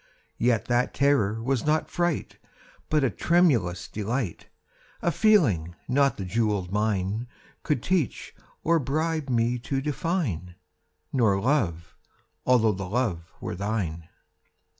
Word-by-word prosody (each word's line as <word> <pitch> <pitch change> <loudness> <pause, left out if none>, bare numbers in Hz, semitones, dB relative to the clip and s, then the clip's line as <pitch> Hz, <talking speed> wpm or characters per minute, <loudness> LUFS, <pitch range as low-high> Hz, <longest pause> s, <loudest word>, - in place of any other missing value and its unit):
Yet 120 -2 +2
that 120 +1 +1
terror 115 -6 +2
was 130 -1 0
not 155 +1 +1
fright, 175 -3 -1 0.5
But 150 -2 +2
a 130 - +2
tremulous 110 - +2
delight— 110 -2 -3 0.6
A 170 - +2
feeling 130 - +3
not 140 +2 +2
the 95 - -4
jewelled 105 -2 0
mine 105 +2 0 0.3
Could 145 -6 -1
teach 180 - -1 0.3
or 165 0 +3
bribe 155 +1 -1
me 120 0 +1
to 135 +3 -2
define— 135 - -2 0.6
Nor 110 -7 +3
Love—although 110 - 0
the 95 -2 -5
Love 100 -8 -1
were - - -4
thine. 90 -5 -3
115 Hz, 120 wpm, -26 LUFS, 95-145 Hz, 0.6 s, feeling